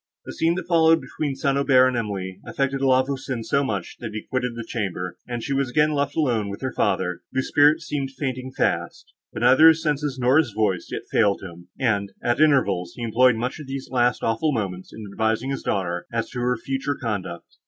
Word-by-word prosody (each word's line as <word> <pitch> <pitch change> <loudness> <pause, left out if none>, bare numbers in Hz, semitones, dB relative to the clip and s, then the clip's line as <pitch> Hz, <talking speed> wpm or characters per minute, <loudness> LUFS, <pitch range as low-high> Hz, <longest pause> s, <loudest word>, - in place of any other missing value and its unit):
The - - -7
scene, 165 +1 +1
that 185 - -5
followed 165 -1 +5
between 135 +1 -4
St. 135 +1 0
Aubert 130 -2 +5
and 130 - -3
Emily, 100 -5 -4
affected 135 0 -1
La 130 -1 +4
Voisin 135 -3 -4
so 140 +5 +1
much, 100 -9 -4
that 115 -3 -6
he 110 - -5
quitted 125 -2 -2
the 115 -1 -6
chamber, 90 -6 -3
and 120 -2 -4
she 140 - -2
was 135 -1 0
again 150 +4 +3
left 140 -1 -1
alone 120 -9 +1
with 100 +1 -7
her 130 -1 -3
father, 95 -4 0
whose 130 0 -1
spirits 150 +2 +4
seemed 140 -4 -2
fainting 130 -1 -4
fast, - - -2 0.2
but - - -6
neither 155 +5 +7
his 160 0 +5
senses, 150 -3 -1
nor 130 +4 +4
his 120 -9 0
voice, 100 -5 0
yet - - -4
failed 100 -3 +2
him; 85 -1 -10
and, 100 -6 0
at 120 +4 +1
intervals, 100 - +2
he 120 - -6
employed 120 +2 +4
much 125 +6 -3
of 150 - -9
these 135 0 -6
last 120 -1 +1
awful 115 +8 +1
moments 95 -7 -4
in 110 - -9
advising 110 +5 0
his 135 - -3
daughter, 90 -3 -2
as 115 -1 -2
to 125 - -5
her 125 0 0
future 135 +3 -3
conduct. 95 -7 -5
125 Hz, 215 wpm, -23 LUFS, 110-140 Hz, 0.2 s, neither